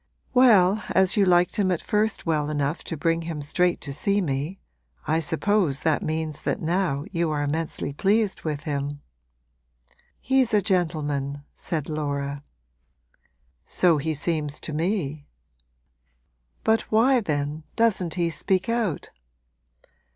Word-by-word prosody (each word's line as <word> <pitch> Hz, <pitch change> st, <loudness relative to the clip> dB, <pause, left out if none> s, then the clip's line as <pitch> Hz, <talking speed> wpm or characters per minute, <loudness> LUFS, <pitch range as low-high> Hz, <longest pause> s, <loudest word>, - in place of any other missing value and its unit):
'Well, 215 Hz, -6 st, +5 dB
as 190 Hz, +2 st, +3 dB
you 205 Hz, -2 st, +4 dB
liked 175 Hz, -1 st, +3 dB
him 195 Hz, -3 st, +2 dB
at 175 Hz, -, 0 dB
first 215 Hz, 0 st, 0 dB
well 150 Hz, -3 st, 0 dB
enough 145 Hz, +2 st, -2 dB
to 165 Hz, -, -4 dB
bring 165 Hz, +2 st, +1 dB
him 165 Hz, -3 st, -5 dB
straight 175 Hz, +4 st, +1 dB
to 140 Hz, -, -6 dB
see 200 Hz, +8 st, +1 dB
me, 150 Hz, +2 st, -2 dB, 0.5 s
I 160 Hz, +2 st, +1 dB
suppose 165 Hz, -1 st, +1 dB
that 160 Hz, -2 st, +1 dB
means 155 Hz, -1 st, -3 dB
that -, -, -1 dB
now 165 Hz, -4 st, -1 dB
you 170 Hz, -3 st, 0 dB
are 150 Hz, -1 st, -1 dB
immensely 150 Hz, -1 st, -3 dB
pleased 200 Hz, +5 st, +1 dB
with 150 Hz, -2 st, -4 dB
him.' 145 Hz, -1 st, -3 dB, 1.2 s
'He's 260 Hz, -4 st, +2 dB
a -, -, +5 dB
gentleman,' 145 Hz, -7 st, -1 dB
said 155 Hz, -4 st, -4 dB
Laura. 145 Hz, -2 st, -3 dB, 1.2 s
'So 170 Hz, -4 st, +2 dB
he 155 Hz, +2 st, -2 dB
seems 150 Hz, -1 st, -2 dB
to 155 Hz, -, -5 dB
me. 155 Hz, -3 st, -2 dB, 1.4 s
But 220 Hz, 0 st, +1 dB
why 250 Hz, +4 st, +4 dB
then 150 Hz, -3 st, -2 dB
doesn't 190 Hz, -7 st, +1 dB
he 170 Hz, -2 st, 0 dB
speak 185 Hz, +5 st, 0 dB
out?' 230 Hz, -9 st, -1 dB
165 Hz, 135 wpm, -25 LUFS, 145-190 Hz, 1.4 s, Well